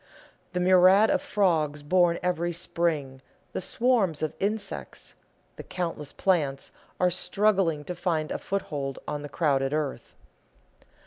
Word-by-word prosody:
The 180 - -1
myriads 185 +4 +5
of - - 0
frogs 155 -7 0
born 175 +2 +3
every 175 -1 0
spring, 160 -6 -1 0.3
the - - -3
swarms 200 - +1
of 155 - -1
insects, 205 +1 -4 0.4
the - - -7
countless 165 -5 -4
plants, 145 -8 0 0.3
are 180 0 +3
struggling 180 -3 +1
to 180 - -5
find 165 -3 -2
a - - -2
foothold 145 -8 -3
on 150 - -3
the 145 - -7
crowded 140 -4 +1
earth. 150 -3 -3
170 Hz, 130 wpm, -27 LUFS, 150-185 Hz, 0.4 s, myriads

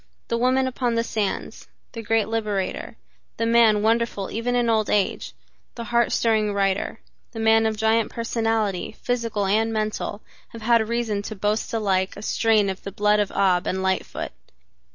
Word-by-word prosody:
The 235 - 0
woman 255 +2 +2
upon 245 -2 -1
the 230 - +1
sands, 215 -4 -3 0.2
the 230 - -6
great 225 -1 +1
liberator, 215 -4 -3 0.4
the 230 - 0
man 230 -2 +4
wonderful 225 -3 0
even 240 +3 -1
in 240 -1 +2
old 220 -2 +1
age, 205 -2 0 0.4
the 235 - -5
heart 235 +1 +1
stirring 215 -2 +1
writer, 195 +2 0 0.3
the 225 - -6
man 225 0 +4
of 220 -1 -2
giant 220 +1 +2
personality 225 -5 -1
physical 230 -4 -1
and 220 +3 +1
mental, 215 -1 -3 0.3
have 230 -1 -9
had 230 -1 +3
reason 230 -3 -1
to 215 +2 -6
boast 210 +2 -1
alike 195 -4 0
a 205 - -8
strain 220 -2 +2
of 190 -1 -4
the 195 - -7
blood 210 +1 +2
of 205 -1 +1
Ab 185 -2 +2
and 190 0 -1
Lightfoot. 190 0 -2
220 Hz, 170 wpm, -23 LUFS, 205-230 Hz, 0.4 s, man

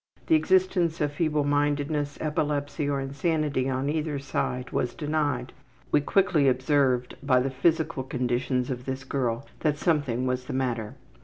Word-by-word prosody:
The - - +2
existence 185 - +2
of 150 -2 +1
feeblemindedness, 145 -1 0
epilepsy, 150 -1 -1
or 140 -1 0
insanity 140 0 0
on 130 +1 -1
either 150 0 -1
side 130 -2 -3
was 125 - -1
denied. 145 -5 -1 0.4
We 145 - +4
quickly 165 -3 +3
observed 130 -1 +2
by 130 -2 +3
the 135 +2 -1
physical 160 +2 +1
conditions 125 0 -1
of 125 0 -5
this 130 0 -4
girl 130 -2 -2
that 150 -2 +1
something 145 -7 +1
was 125 0 -1
the - - -5
matter. 125 -3 -2
140 Hz, 145 wpm, -27 LUFS, 130-150 Hz, 0.4 s, We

